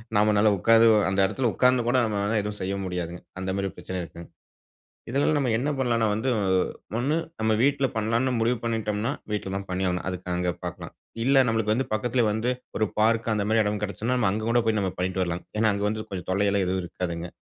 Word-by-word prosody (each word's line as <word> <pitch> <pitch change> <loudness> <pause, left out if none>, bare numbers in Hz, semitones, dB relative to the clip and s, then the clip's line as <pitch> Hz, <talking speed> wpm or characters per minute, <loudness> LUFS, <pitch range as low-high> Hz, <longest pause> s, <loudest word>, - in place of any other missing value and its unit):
நம்மாளால 105 0 +4
உட்கார்ந்து 115 +4 +5 0.2
அந்த 95 +1 0
இடத்துல 120 +5 0
உட்கார்ந்து 125 +3 +3
கூட 125 +2 +3
நம்மளால 105 0 0
எதுவும் 105 0 -5
செய்ய 95 +1 -2
முடியாதுங்க. 90 -1 -4 0.2
அந்த 95 0 -3
மாரி 100 0 -1
பிரச்சன 90 +1 -5
இருக்குங்க. 85 0 -10 0.8
இதுல 140 +5 +2
நம்ம 135 -4 +1
என்ன 135 +6 -1
பண்ணலாம்னா 115 -3 +2
வந்து 110 +5 -1 0.7
ஒண்ணு, 135 +6 +1 0.3
நம்ம 110 0 +2
வீட்ல 140 0 +2
பண்ணலாம்னு 115 +4 +1
முடிவு 120 +2 +1
பண்ணிட்டோம்னா, 110 0 -1 0.2
வீட்ல 105 -2 -2
தான் 100 0 -5
பண்ணியாவனும். 90 -1 -1
அதுக்கு 90 -1 -6
அங்க 90 0 0 0.2
பாக்கலாம். - - -6 0.3
இல்ல 135 +3 +4
நமக்கு 110 -1 +1
வந்து 130 +4 0
பக்கத்துல 120 +3 +1
வந்து, 110 +3 -1 0.3
ஒரு 110 - +2
பார்க் 115 +1 +2
அந்த 105 -1 0
மாரி 110 0 +4
இடம் 105 0 -2
கிடச்சுனா. 110 +5 -1
நம்ம 110 -6 +2
அங்க 110 +2 -2
கூட 120 +1 +4
போயி 110 -1 +2
நம்ம 95 -2 -1
பண்ணிட்டு 95 +1 -1
வரலாம். 85 0 -3 0.2
ஏனா, 110 - +3
அங்க 100 0 -2
வந்து 110 +1 -3
கொஞ்சம் 90 -3 -5
தொல்லை 100 +2 +2
எல்லாம் 100 -1 +1
எதுவும் 95 0 0
இருக்காதுங்க. 85 -1 -4
105 Hz, 195 wpm, -26 LUFS, 95-115 Hz, 0.8 s, உட்கார்ந்து